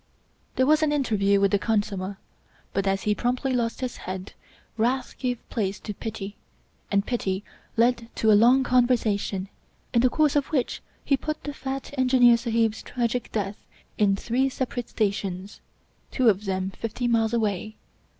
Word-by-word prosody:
There 260 Hz, -, +3 dB
was 305 Hz, +2 st, +4 dB
an 310 Hz, -1 st, +2 dB
interview 210 Hz, -8 st, +2 dB
with 200 Hz, -1 st, +3 dB
the 205 Hz, -, +3 dB
khansamah, 200 Hz, -3 st, -1 dB, 0.6 s
but 195 Hz, 0 st, 0 dB
as 195 Hz, 0 st, +1 dB
he 210 Hz, -, +2 dB
promptly 250 Hz, +4 st, -1 dB
lost 235 Hz, -1 st, -1 dB
his 255 Hz, -2 st, -3 dB
head, 185 Hz, +1 st, -6 dB, 0.4 s
wrath 250 Hz, +3 st, 0 dB
gave 250 Hz, -3 st, -3 dB
place 200 Hz, -4 st, -1 dB
to 210 Hz, -, -5 dB
pity, 210 Hz, -1 st, -6 dB, 0.5 s
and 200 Hz, 0 st, +2 dB
pity 195 Hz, -5 st, -2 dB, 0.3 s
led 235 Hz, 0 st, +2 dB
to 220 Hz, -, +3 dB
a -, -, +7 dB
long 245 Hz, +6 st, +6 dB
conversation, 225 Hz, -6 st, +1 dB, 0.5 s
in 235 Hz, -, +4 dB
the 255 Hz, -, +4 dB
course 300 Hz, +1 st, +2 dB
of 285 Hz, -2 st, +2 dB
which 270 Hz, -6 st, -1 dB, 0.2 s
he 280 Hz, -, +4 dB
put 305 Hz, +3 st, -4 dB
the 290 Hz, -, -4 dB
fat 270 Hz, 0 st, -5 dB
Engineer 250 Hz, -2 st, +6 dB
Sahib's 225 Hz, -2 st, 0 dB
tragic 240 Hz, 0 st, -2 dB
death 200 Hz, -2 st, -3 dB, 0.4 s
in 200 Hz, -2 st, +4 dB
three 250 Hz, +6 st, 0 dB
separate 250 Hz, -2 st, -4 dB
stations 195 Hz, -2 st, -2 dB, 0.3 s
— -, -, -39 dB
^two 255 Hz, -2 st, +2 dB
of 200 Hz, +2 st, -5 dB
them 190 Hz, 0 st, -1 dB
fifty 230 Hz, +4 st, -3 dB
miles 225 Hz, -2 st, +2 dB
away. 215 Hz, -2 st, -1 dB
230 Hz, 165 wpm, -25 LUFS, 200-255 Hz, 0.6 s, a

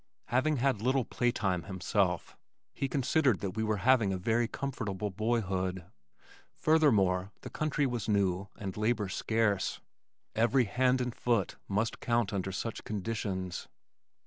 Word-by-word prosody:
Having 135 Hz, +5 st, +2 dB
had 130 Hz, -4 st, +1 dB
little 130 Hz, +1 st, +2 dB
play 120 Hz, -1 st, +1 dB
time 95 Hz, -7 st, 0 dB
himself, 95 Hz, -1 st, -1 dB, 0.4 s
he 135 Hz, -, -2 dB
considered 135 Hz, -3 st, +2 dB
that 100 Hz, -2 st, -2 dB
we 110 Hz, +4 st, -2 dB
were 110 Hz, -1 st, 0 dB
having 125 Hz, -6 st, +5 dB
a 95 Hz, -, -1 dB
very 115 Hz, +5 st, +1 dB
comfortable 105 Hz, -7 st, -3 dB
boyhood. 95 Hz, -4 st, -1 dB, 0.7 s
Furthermore 100 Hz, -, +3 dB
the -, -, -8 dB
country 150 Hz, -1 st, 0 dB
was 120 Hz, -5 st, -2 dB
new 100 Hz, -2 st, +1 dB
and 95 Hz, -4 st, -5 dB
labor 105 Hz, -2 st, 0 dB
scarce. 105 Hz, -1 st, 0 dB, 0.5 s
Every 120 Hz, +3 st, +3 dB
hand 125 Hz, +4 st, +2 dB
and 125 Hz, -1 st, -2 dB
foot 115 Hz, -7 st, 0 dB
must 105 Hz, +3 st, -1 dB
count 115 Hz, -4 st, 0 dB
under 95 Hz, -1 st, -2 dB
such 115 Hz, +4 st, -4 dB
conditions. 100 Hz, -3 st, -3 dB
110 Hz, 140 wpm, -31 LUFS, 95-125 Hz, 0.7 s, having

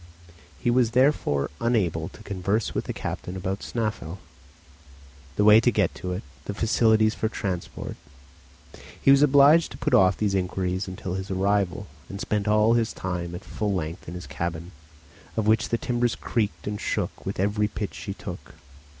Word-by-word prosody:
He 120 Hz, -, 0 dB
therefore 125 Hz, -, +3 dB
was 70 Hz, -, -2 dB
unable 95 Hz, -9 st, 0 dB
to 110 Hz, -, -14 dB
converse 100 Hz, +2 st, -1 dB
with -, -, -2 dB
the -, -, -3 dB
captain 90 Hz, -, -5 dB
about 95 Hz, +1 st, -3 dB
Snæfell, 105 Hz, -7 st, -3 dB, 1.2 s
the 105 Hz, -, +2 dB
way 105 Hz, +1 st, +8 dB
to 120 Hz, -, +3 dB
get 105 Hz, -6 st, +1 dB
to 90 Hz, -, -5 dB
it, 90 Hz, -, -4 dB, 0.2 s
the 100 Hz, -, -4 dB
facilities 110 Hz, -1 st, +3 dB
for 110 Hz, -, -1 dB
transport, 95 Hz, -5 st, -4 dB, 1.0 s
he 135 Hz, -, +5 dB
was 140 Hz, 0 st, +6 dB
obliged 145 Hz, +3 st, +6 dB
to -, -, -9 dB
put -, -, -1 dB
off 95 Hz, -6 st, +5 dB
these 105 Hz, -2 st, 0 dB
inquiries 95 Hz, 0 st, -1 dB
until 95 Hz, -1 st, -5 dB
his 95 Hz, 0 st, -4 dB
arrival, 100 Hz, 0 st, 0 dB, 0.2 s
and 100 Hz, -, -6 dB
spent 105 Hz, -2 st, -1 dB
all 105 Hz, +2 st, +4 dB
his 115 Hz, -2 st, +1 dB
time 90 Hz, -2 st, -4 dB
at 90 Hz, -, -9 dB
full 105 Hz, -2 st, -2 dB
length 80 Hz, -1 st, -4 dB
in 85 Hz, -, -6 dB
his 90 Hz, -, -7 dB
cabin, 85 Hz, +1 st, -4 dB, 0.7 s
of 110 Hz, -, +1 dB
which 110 Hz, +1 st, +3 dB
the 115 Hz, -, +1 dB
timbers 120 Hz, -1 st, 0 dB
creaked 110 Hz, -4 st, -2 dB
and 105 Hz, 0 st, -4 dB
shook -, -, -2 dB
with -, -, -4 dB
every 105 Hz, +2 st, +1 dB
pitch -, -, -5 dB
she -, -, -6 dB
took. -, -, -9 dB
105 Hz, 175 wpm, -25 LUFS, 95-115 Hz, 1.2 s, way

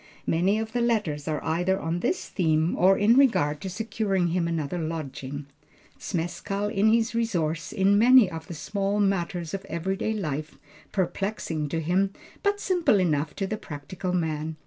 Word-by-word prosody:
Many 185 Hz, +6 st, +2 dB
of 220 Hz, 0 st, -3 dB
the 240 Hz, -, -1 dB
letters 205 Hz, -12 st, 0 dB
are 155 Hz, -1 st, -2 dB
either 180 Hz, +4 st, +1 dB
on 165 Hz, 0 st, -2 dB
this 365 Hz, -, -1 dB
theme 160 Hz, -2 st, +1 dB
or 190 Hz, +2 st, +5 dB
in 215 Hz, +3 st, +4 dB
regard 150 Hz, -, +3 dB
to 190 Hz, -, -4 dB
securing 200 Hz, -2 st, -1 dB
him 170 Hz, 0 st, 0 dB
another 165 Hz, 0 st, -2 dB
lodging. 145 Hz, -3 st, -5 dB, 0.5 s
Zmeskall 195 Hz, +3 st, -3 dB
is 210 Hz, +2 st, +4 dB
his 230 Hz, 0 st, +2 dB
resource 170 Hz, -9 st, -1 dB
in 200 Hz, -1 st, +3 dB
many 250 Hz, -1 st, +7 dB
of 165 Hz, -2 st, -7 dB
the 170 Hz, -, -7 dB
small 200 Hz, +5 st, -1 dB
matters 175 Hz, -4 st, 0 dB
of 195 Hz, 0 st, -3 dB
every 185 Hz, +2 st, -2 dB
day 220 Hz, +3 st, -1 dB
life, 155 Hz, -7 st, -4 dB, 0.3 s
perplexing 185 Hz, -5 st, -2 dB
to 165 Hz, -, -1 dB
him, 185 Hz, +5 st, +1 dB, 0.3 s
but 405 Hz, -1 st, +1 dB
simple 355 Hz, -, +2 dB
enough 155 Hz, -4 st, 0 dB
to 195 Hz, -, -2 dB
the 215 Hz, +3 st, -3 dB
practical 180 Hz, +2 st, -6 dB
man. 160 Hz, -3 st, -1 dB
180 Hz, 170 wpm, -26 LUFS, 160-205 Hz, 0.5 s, many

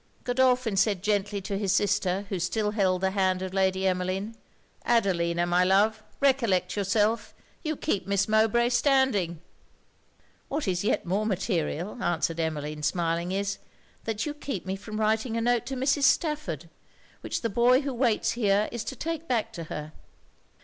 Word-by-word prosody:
Godolphin 250 Hz, -4 st, +2 dB
said 195 Hz, -2 st, +2 dB
gently 205 Hz, -1 st, 0 dB
to 195 Hz, +1 st, -3 dB
his 200 Hz, -3 st, 0 dB
sister, 195 Hz, -1 st, +1 dB
who 190 Hz, -, -2 dB
still 210 Hz, +5 st, 0 dB
held 190 Hz, -4 st, +1 dB
the 190 Hz, 0 st, +1 dB
hand 190 Hz, -1 st, +1 dB
of 190 Hz, 0 st, -5 dB
Emmeline 190 Hz, +2 st, 0 dB, 0.5 s
'Adelina, 175 Hz, -7 st, +1 dB
my 175 Hz, +1 st, +3 dB
love, 205 Hz, +4 st, +3 dB, 0.2 s
recollect 250 Hz, -9 st, +2 dB
yourself 210 Hz, +2 st, 0 dB, 0.3 s
you 310 Hz, -1 st, -2 dB
keep 240 Hz, -11 st, -2 dB
Miss 200 Hz, -1 st, +1 dB
Mowbray 220 Hz, +2 st, +3 dB
standing.' 240 Hz, -, +2 dB, 1.1 s
'What 290 Hz, -3 st, -3 dB
is 180 Hz, -1 st, 0 dB
yet 210 Hz, -, 0 dB
more 200 Hz, +5 st, 0 dB
material,' 190 Hz, -, -2 dB
answered 170 Hz, -1 st, 0 dB
Emmeline, 150 Hz, -2 st, -3 dB
smiling, 170 Hz, +2 st, 0 dB
is, 200 Hz, +1 st, -2 dB, 0.5 s
'that 215 Hz, -2 st, -2 dB
you 300 Hz, -, -3 dB
keep 275 Hz, -, -5 dB
me 190 Hz, 0 st, -2 dB
from 215 Hz, +2 st, -7 dB
writing 220 Hz, +2 st, +1 dB
a -, -, 0 dB
note 240 Hz, -1 st, +1 dB
to 270 Hz, -, -3 dB
Mrs. 275 Hz, +3 st, +1 dB
Stafford, 280 Hz, -, 0 dB, 0.5 s
which -, -, -3 dB
the 230 Hz, -, +1 dB
boy 245 Hz, +5 st, +4 dB
who 280 Hz, -2 st, -3 dB
waits 235 Hz, -3 st, +1 dB
here 210 Hz, -3 st, +1 dB
is 235 Hz, -2 st, -4 dB
to 265 Hz, -, -5 dB
take 330 Hz, +4 st, -4 dB
back 230 Hz, -2 st, -1 dB
to 170 Hz, -5 st, -6 dB
her.' 150 Hz, 0 st, -6 dB
205 Hz, 160 wpm, -27 LUFS, 185-235 Hz, 1.1 s, boy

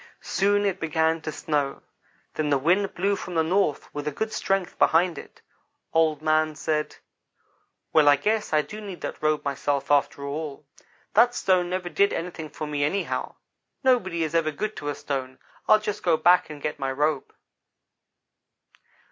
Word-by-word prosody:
Soon 205 Hz, +1 st, +2 dB
it 190 Hz, -2 st, 0 dB
began 160 Hz, 0 st, +1 dB
to 155 Hz, -, -4 dB
snow 145 Hz, -2 st, -2 dB, 0.5 s
then 155 Hz, -1 st, -1 dB
the 140 Hz, -, +3 dB
wind 180 Hz, +8 st, +1 dB
blew 200 Hz, +3 st, +1 dB
from 180 Hz, -2 st, -7 dB
the 160 Hz, -, +3 dB
north 175 Hz, -2 st, +1 dB
with 145 Hz, 0 st, -5 dB
a -, -, 0 dB
good 220 Hz, +9 st, -3 dB
strength 195 Hz, -2 st, -1 dB
behind 170 Hz, +1 st, +4 dB
it. -, -, -14 dB, 0.5 s
Old 160 Hz, -2 st, +2 dB
man 155 Hz, 0 st, +2 dB
said: 150 Hz, 0 st, -2 dB, 1.0 s
"'Well, 150 Hz, -2 st, +6 dB
I 145 Hz, -, +7 dB
guess 210 Hz, +9 st, -1 dB
I 155 Hz, -1 st, +3 dB
do 215 Hz, +4 st, -9 dB
need 195 Hz, -4 st, -8 dB
that -, -, -5 dB
robe 155 Hz, -1 st, +1 dB
myself, 140 Hz, 0 st, -1 dB
after 140 Hz, 0 st, +2 dB
all. 145 Hz, 0 st, -5 dB, 0.5 s
That 240 Hz, +3 st, +5 dB
stone 180 Hz, -2 st, +2 dB
never 180 Hz, 0 st, -2 dB
did 200 Hz, +3 st, +2 dB
anything 165 Hz, -2 st, -5 dB
for 155 Hz, -, -6 dB
me 145 Hz, -1 st, -2 dB
anyhow. 190 Hz, +7 st, -2 dB, 0.5 s
Nobody 190 Hz, -10 st, +2 dB
is 155 Hz, -1 st, -3 dB
ever 165 Hz, -2 st, +2 dB
good 215 Hz, +8 st, -4 dB
to 145 Hz, -, -4 dB
a 145 Hz, -, -2 dB
stone. 130 Hz, -2 st, -4 dB, 0.3 s
I'll 215 Hz, -, +7 dB
just 210 Hz, -1 st, -4 dB
go 170 Hz, -3 st, +3 dB
back 175 Hz, 0 st, +4 dB
and 150 Hz, -2 st, -9 dB
get 150 Hz, -, -3 dB
my 135 Hz, -1 st, -1 dB
robe.' 145 Hz, +1 st, -1 dB
160 Hz, 175 wpm, -25 LUFS, 150-190 Hz, 1.0 s, I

